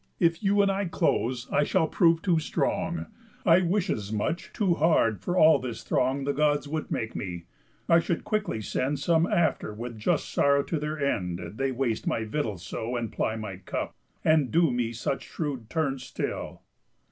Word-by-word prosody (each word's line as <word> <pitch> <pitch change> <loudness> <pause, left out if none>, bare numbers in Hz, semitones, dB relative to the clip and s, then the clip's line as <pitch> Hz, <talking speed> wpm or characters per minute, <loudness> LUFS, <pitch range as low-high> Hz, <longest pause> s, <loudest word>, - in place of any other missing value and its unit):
If 165 -1 +2
you 200 0 +3
and 200 - +3
I 195 +1 -1
close, 125 -7 0
I 145 - +3
shall 165 +2 +2
prove 165 -1 +3
too 175 -4 +3
strong. 160 +2 -1 0.4
I 175 0 +6
wish 185 +2 +1
as 105 - -2
much 110 +11 -2
too 195 -6 +1
hard 150 - +2
for 180 +1 -2
all 155 -4 +7
this 120 -3 -6
throng 130 +2 +1
The 140 +1 0
Gods 145 0 +1
would 155 +1 -3
make 115 -1 -3
me, 85 -3 -5 0.4
I 165 - +6
should 165 0 -2
quickly 210 - -1
send 135 +7 -1
Some 165 +4 +2
after 160 -10 0
with 115 0 -6
just 105 - 0
sorrow 140 0 +3
to 160 - -2
their 150 +1 -3
end, 90 -11 -1 0.2
They 135 0 +1
waste 125 -3 -1
my 115 - 0
victuals 110 - -3
so, 115 +7 -4
and 115 -2 -3
ply 110 - -1
my 105 -4 -6
cup, 95 - -4 0.3
And 155 -5 +4
do 165 -3 +3
me 120 -2 -1
such 120 +4 -3
shrewd 135 -8 -4
turns 140 -5 -1
still." - - -5
140 Hz, 185 wpm, -27 LUFS, 115-165 Hz, 0.4 s, all